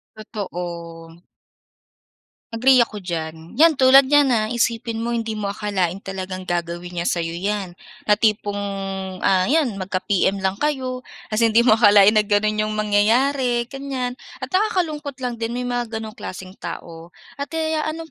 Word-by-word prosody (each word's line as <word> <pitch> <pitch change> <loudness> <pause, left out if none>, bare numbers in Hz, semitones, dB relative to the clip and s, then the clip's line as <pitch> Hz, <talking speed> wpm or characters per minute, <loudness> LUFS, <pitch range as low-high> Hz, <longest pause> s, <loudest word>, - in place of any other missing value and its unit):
Totoo. 170 -6 -7 1.4
Agree 250 +2 +5
ako 215 -2 -8
diyan. 165 -1 -6
'Yan 315 +1 +5
tulad 265 +1 +8
niyan, 290 -1 +6
ah, 215 -1 +1
isipin 230 -1 -1
mo 235 +1 -2
hindi 225 -2 -3
mo 205 - -2
akalain 200 -2 -2
talagang 185 -1 -5
gagawin 175 0 -4
niya 170 - -1
sa'yo 165 -1 -1
'yan, 195 +2 -3 0.3
na 210 0 +2
tipong, 210 -2 +1 0.6
ah, 185 -1 +3
'yan 275 -9 +1
magka-PM 190 +1 0
lang 190 +1 -1
kayo. 260 -4 -1 0.3
Kasi 225 +2 +3
hindi 225 +1 +4
mo 225 -2 +4
akalain 205 -2 +7
na 215 -1 +2
gano'n 215 +1 +1
'yong 215 0 -1
mangyayari 240 +5 +2
ganiyan. 265 -2 -4 0.2
At - - -6
nakakalungkot 350 -8 0
lang 240 -2 -3
din 230 +1 -3
may 250 - -2
mga 245 -2 -3
gano'ng 220 -1 -5
klaseng 185 -2 -8
tao. 165 0 -8 0.2
At 280 - -3
ano 315 0 -2
215 Hz, 150 wpm, -21 LUFS, 190-250 Hz, 1.4 s, tulad